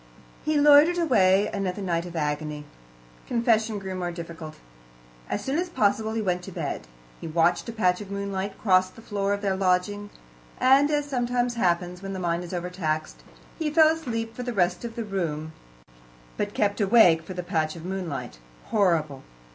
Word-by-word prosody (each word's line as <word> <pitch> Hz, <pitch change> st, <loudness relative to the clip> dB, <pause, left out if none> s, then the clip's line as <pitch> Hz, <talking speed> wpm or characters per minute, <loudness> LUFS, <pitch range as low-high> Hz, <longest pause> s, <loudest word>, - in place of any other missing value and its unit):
He 305 Hz, -1 st, +1 dB
loitered 295 Hz, +4 st, +6 dB
away 205 Hz, -, +4 dB
another 195 Hz, -1 st, -2 dB
night 170 Hz, -1 st, -1 dB
of 175 Hz, -, -10 dB
agony. 150 Hz, -1 st, -3 dB, 0.6 s
Confession 225 Hz, -2 st, +1 dB
grew 190 Hz, -1 st, -5 dB
more 180 Hz, -1 st, -3 dB
difficult. 165 Hz, -2 st, -8 dB, 0.7 s
As -, -, -2 dB
soon 275 Hz, +4 st, -1 dB
as 360 Hz, 0 st, -2 dB
possible 220 Hz, -5 st, +1 dB
he 225 Hz, -1 st, -1 dB
went 180 Hz, -2 st, 0 dB
to -, -, -8 dB
bed. -, -, -4 dB, 0.3 s
He -, -, -7 dB
watched 170 Hz, +6 st, +1 dB
a -, -, -2 dB
patch 185 Hz, -5 st, +1 dB
of 205 Hz, -, -9 dB
moonlight 200 Hz, 0 st, -4 dB
cross 185 Hz, -3 st, +3 dB
the 225 Hz, +4 st, -15 dB
floor 200 Hz, -2 st, -1 dB
of 200 Hz, 0 st, -1 dB
their 195 Hz, -1 st, +1 dB
lodging, 190 Hz, +2 st, 0 dB, 0.5 s
and, 275 Hz, +3 st, +5 dB
as 295 Hz, -1 st, +1 dB
sometimes 245 Hz, -2 st, 0 dB
happens 180 Hz, -4 st, 0 dB
when 195 Hz, 0 st, -5 dB
the 190 Hz, -, -4 dB
mind 170 Hz, -1 st, -1 dB
is 175 Hz, -, -8 dB
overtaxed, 175 Hz, -3 st, -3 dB, 0.4 s
he 315 Hz, -2 st, 0 dB
fell 310 Hz, +1 st, +6 dB
asleep 230 Hz, -8 st, -3 dB
for 250 Hz, -, -5 dB
the 245 Hz, -1 st, -3 dB
rest 180 Hz, -1 st, +1 dB
of 235 Hz, -1 st, -6 dB
the 230 Hz, -, -4 dB
room, 160 Hz, -6 st, -3 dB, 0.8 s
but -, -, -3 dB
kept 205 Hz, +1 st, +1 dB
awake 195 Hz, -6 st, +6 dB
for 185 Hz, +3 st, -9 dB
the 180 Hz, -, -4 dB
patch 160 Hz, -3 st, -1 dB
of 170 Hz, 0 st, -9 dB
moonlight. 180 Hz, -, -5 dB, 0.3 s
Horrible! 165 Hz, -9 st, +1 dB
195 Hz, 180 wpm, -26 LUFS, 175-230 Hz, 0.8 s, loitered